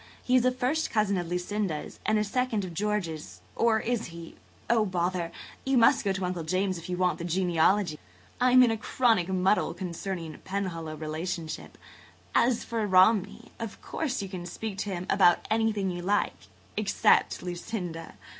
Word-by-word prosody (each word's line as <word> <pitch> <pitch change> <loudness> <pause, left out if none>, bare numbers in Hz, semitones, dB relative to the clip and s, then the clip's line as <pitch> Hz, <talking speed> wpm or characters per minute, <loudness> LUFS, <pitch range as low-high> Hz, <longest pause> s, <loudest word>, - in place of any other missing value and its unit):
He 255 - +2
is 255 - +5
a 255 - +4
first 260 +5 0
cousin 210 -3 +1
of 175 - -4
Lucinda's 180 -1 -3
and 215 0 +3
a 210 - +2
second 220 -1 -1
of 175 - -7
George's–or 210 +3 -1
is 240 -1 -1
he? 170 -1 -10 0.3
Oh, 230 -2 +3
bother! 180 -3 -1 0.3
You 265 -1 +2
must 230 - +5
go 200 - +1
to 190 -1 -2
Uncle 180 -1 -2
Julius 185 +2 -1
if 165 - -10
you 180 - -2
want 180 -1 +1
the - - -4
genealogy. 175 0 +2 0.4
I'm 255 0 +6
in 240 - +4
a 225 - -1
chronic 220 -5 +2
muddle 190 +2 +2
concerning 175 -3 -5
Penhallow 175 -5 -4
relationship. 160 +1 -5 0.6
And, 235 - +5
as 240 - -1
for 225 -2 -2
Romney, 190 +2 +3
of 230 -3 -6
course 270 -9 -2
you - - -4
can 180 -2 -6
speak 200 +1 -5
to 205 - -2
him 180 -2 -3
about 180 -3 +4
anything 220 -4 +1
you 175 0 -5
like 200 +3 +1 0.4
except 210 -2 +2
Lucinda. 175 -2 -5
190 Hz, 170 wpm, -28 LUFS, 175-220 Hz, 0.6 s, I'm